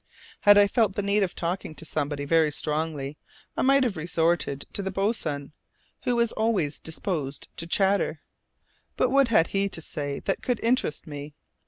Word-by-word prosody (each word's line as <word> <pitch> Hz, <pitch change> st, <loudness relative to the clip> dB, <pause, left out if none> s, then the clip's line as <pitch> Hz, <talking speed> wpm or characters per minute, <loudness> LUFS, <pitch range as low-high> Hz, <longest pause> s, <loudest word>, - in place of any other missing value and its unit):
Had 205 Hz, 0 st, +7 dB
I 205 Hz, -, +8 dB
felt 205 Hz, -1 st, +1 dB
the 205 Hz, -, -1 dB
need 200 Hz, +1 st, +2 dB
of 190 Hz, -3 st, -1 dB
talking 170 Hz, -2 st, -3 dB
to 165 Hz, -, -10 dB
somebody 145 Hz, -2 st, -2 dB
very 160 Hz, 0 st, +3 dB
strongly, 150 Hz, -1 st, -3 dB, 0.4 s
I -, -, -1 dB
might 275 Hz, +1 st, +5 dB
have 235 Hz, -6 st, 0 dB
resorted 165 Hz, -3 st, 0 dB
to -, -, -1 dB
the 190 Hz, -, -2 dB
boatswain, 185 Hz, -8 st, -1 dB, 0.5 s
who 245 Hz, -1 st, +2 dB
was 235 Hz, -1 st, +2 dB
always 200 Hz, -10 st, 0 dB
disposed 155 Hz, -4 st, -4 dB
to 165 Hz, -, -4 dB
chatter; 195 Hz, +3 st, +1 dB, 0.8 s
but -, -, +2 dB
what 275 Hz, -1 st, +5 dB
had 190 Hz, -8 st, +3 dB
he 200 Hz, 0 st, 0 dB
to 170 Hz, -, -7 dB
say 145 Hz, -3 st, -4 dB
that 195 Hz, -, -1 dB
could 245 Hz, -3 st, -1 dB
interest 235 Hz, -, +1 dB
me? 145 Hz, -1 st, -8 dB
170 Hz, 175 wpm, -26 LUFS, 150-205 Hz, 0.8 s, I